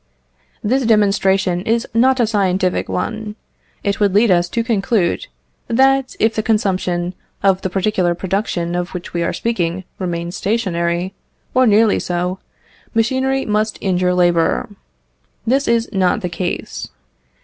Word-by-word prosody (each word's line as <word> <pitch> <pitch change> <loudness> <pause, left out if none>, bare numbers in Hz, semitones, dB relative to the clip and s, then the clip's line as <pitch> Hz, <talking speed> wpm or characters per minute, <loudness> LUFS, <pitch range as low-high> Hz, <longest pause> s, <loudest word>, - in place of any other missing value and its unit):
This 260 +5 +1
demonstration 195 -4 +2
is 230 +4 0
not 255 +3 +3
a 240 - +4
scientific 190 -4 0
one. 215 +2 -3 0.5
It 200 -1 -1
would 200 -2 +2
lead 215 0 +5
us 175 -1 +3
to 230 +5 -1
conclude, 220 - 0 0.4
that 265 +2 +2
if 220 +1 +3
the 215 - 0
consumption 185 -5 0 0.3
of 195 -1 +3
the 190 - -2
particular 185 -2 +1
production 180 -2 -2
of 175 +1 -3
which 180 - -7
we 170 - -1
are 170 - 0
speaking 185 -6 -2 0.2
remains 175 -1 -3
stationary, 180 -4 -1 0.4
or 255 0 +4
nearly 215 0 +4
so, 180 +1 -2 0.6
machinery 265 +4 +1
must 215 +1 0
injure 180 -2 +1
labour. 175 -2 +2 0.8
This 270 +4 +1
is 235 0 +2
not 190 +2 +2
the 180 - -2
case. 175 +1 -4
195 Hz, 140 wpm, -18 LUFS, 180-225 Hz, 0.8 s, lead